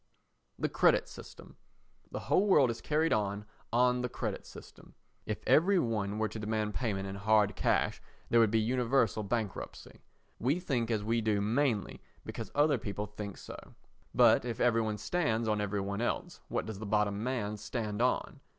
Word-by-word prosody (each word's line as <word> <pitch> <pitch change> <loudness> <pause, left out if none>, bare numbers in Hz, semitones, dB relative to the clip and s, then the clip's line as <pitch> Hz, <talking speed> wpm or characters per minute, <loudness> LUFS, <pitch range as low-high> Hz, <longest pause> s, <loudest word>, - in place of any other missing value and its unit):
The - - 0
Credit - - +3
System - - -12 0.5
The - - -5
whole 205 - +2
world 145 -10 +5
is 115 - -7
carried 155 +2 +1
on 105 -1 -1 0.3
on 125 +1 +3
the 125 - -2
credit - - -4
system; - - -14 0.3
if - - -4
every 190 +5 +4
one 105 - -1
were 110 0 +1
to 110 +1 -7
demand 105 0 -2
payment 100 -5 -2
in 95 - -5
hard 105 0 +2
cash, - - +1 0.3
there 120 - +4
would 115 -2 +5
be 110 +1 +2
universal 120 -1 +1
bankruptcy. 110 -1 -4 0.4
We 140 +9 +1
think 125 -10 -1
as 110 -3 0
we 115 +2 +1
do 105 -2 +1
mainly 115 +1 0 0.2
because - - -6
other 145 +1 +3
people 100 0 -4
think 105 -1 -7
so. - - -11 0.4
But - - +5
if 120 -1 -4
every 115 -2 +3
one 110 -1 -2
stands 115 - 0
on 105 -1 +1
every 105 0 -1
one 100 +2 -3
else, 120 - -2
what - - -2
does 110 -3 -6
the 110 - -6
bottom 105 -1 +1
man 115 -5 -2
stand 105 0 -3
on? 125 - 0
110 Hz, 180 wpm, -31 LUFS, 105-125 Hz, 0.5 s, world